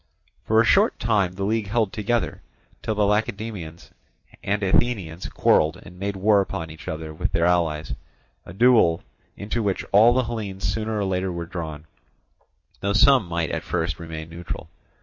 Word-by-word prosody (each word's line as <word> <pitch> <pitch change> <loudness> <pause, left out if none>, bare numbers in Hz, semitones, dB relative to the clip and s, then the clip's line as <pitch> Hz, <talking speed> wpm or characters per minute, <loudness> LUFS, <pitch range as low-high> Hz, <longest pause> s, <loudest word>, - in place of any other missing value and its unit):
For 110 0 +3
a - - +6
short 200 - +4
time 105 -6 +1
the 100 +1 -5
league 110 +1 0
held 110 -1 0
together, 115 +2 -1 0.4
till 110 - -2
the 105 0 +2
Lacedaemonians 105 -5 -3 0.5
and 100 +1 -1
Athenians 95 -4 0
quarrelled 80 +1 +2
and 90 +1 -14
made 100 +1 -2
war 100 +1 +4
upon 80 -4 -5
each 80 - -12
other 80 0 -5
with - - -3
their 85 0 +2
allies, 80 -5 +1 0.5
a - - -11
duel 105 -5 +4 0.3
into 105 +3 -3
which 100 -3 -1
all 110 +4 +7
the 130 - +3
Hellenes 105 -5 -5
sooner 110 +4 -1
or 100 - 0
later 95 0 -1
were 85 -1 -4
drawn, 80 -3 -6 0.9
though 100 +1 -1
some 125 -1 +5
might 85 -1 -2
at - - -2
first 80 -2 -2
remain 80 -1 -7
neutral. 80 -6 -7
95 Hz, 170 wpm, -24 LUFS, 85-110 Hz, 0.9 s, all